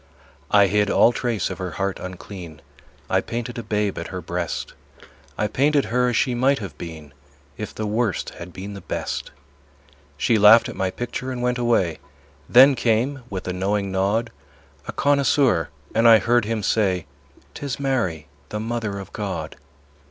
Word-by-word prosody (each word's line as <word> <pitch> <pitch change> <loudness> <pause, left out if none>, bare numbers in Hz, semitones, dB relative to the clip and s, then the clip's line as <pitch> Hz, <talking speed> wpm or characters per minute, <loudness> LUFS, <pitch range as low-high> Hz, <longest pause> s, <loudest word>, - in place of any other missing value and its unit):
I 100 -1 +6
hid 105 +1 +2
all 120 - +5
trace 120 -3 -1
of - - -6
her 90 -3 -4
heart 100 -1 -1
unclean; 90 -3 -9 0.4
I - - +2
painted 120 0 -5
a - - -3
babe 105 -2 -1
at - - -5
her - - -5
breast; - - -4 0.6
I 105 - +1
painted 140 +6 +2
her 125 0 +3
as 120 - 0
she 130 - +2
might 130 +3 +2
have 95 - -7
been 80 -4 -9 0.4
If 105 - -7
the 110 - -3
Worst 110 0 -1
had 85 +1 -10
been 95 +3 -7
the 100 - -8
Best. - - -4 0.9
She 115 -2 +2
laughed 105 +3 +8
at - - -7
my 95 -1 0
picture 120 +5 -5
and 125 -1 -4
went 125 0 0
away. 95 - +1 0.5
Then 135 +3 +8
came, 125 +3 0
with 95 -2 -5
a 90 - -1
knowing 100 +1 -1
nod, 100 +5 0 0.6
A - - -3
connoisseur, 140 - +2 0.2
and 115 +1 +4
I 115 - +9
heard 120 0 +2
him 110 -1 -2
say; 95 -5 +1 0.5
"'Tis 140 -2 -5
Mary, 115 - -1 0.2
the 105 - -4
Mother 110 -2 -3
of 95 -2 -9
God." - - -4
110 Hz, 170 wpm, -23 LUFS, 95-120 Hz, 0.9 s, I